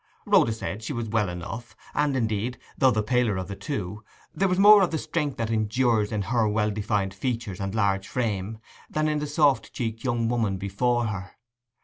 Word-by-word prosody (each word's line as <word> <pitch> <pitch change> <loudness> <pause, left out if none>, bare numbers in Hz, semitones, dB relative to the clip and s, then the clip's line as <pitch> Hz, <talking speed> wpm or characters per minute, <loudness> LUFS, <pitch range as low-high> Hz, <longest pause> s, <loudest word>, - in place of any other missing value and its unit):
Rhoda 115 - +4
said 110 -1 -4
she 115 - -4
was 120 -3 -3
well 105 -3 +1
enough; 95 +7 -7 0.2
and, 145 -2 +1
indeed, 115 +1 -1 0.2
though 135 - +4
the 110 -4 +1
paler 115 -2 +1
of 95 - -4
the 100 - -5
two, 105 -5 -5 0.3
there 195 - +1
was 180 -1 +1
more 205 +1 +8
of 185 - +3
the 160 - -1
strength 150 -2 -2
that 115 -1 -2
endures 110 0 +1
in 105 -2 -1
her 115 +2 +1
well 105 0 +1
defined 100 -2 -1
features 115 -2 -3
and 95 +1 -3
large 100 -3 +1
frame, 110 -3 -2 0.3
than 155 0 0
in 150 -1 0
the 150 - -3
soft 145 -2 +2
cheeked 115 -2 -4
young 120 -3 0
woman 115 -5 0
before 120 +5 0
her. 100 -4 -5
115 Hz, 200 wpm, -26 LUFS, 105-125 Hz, 0.3 s, more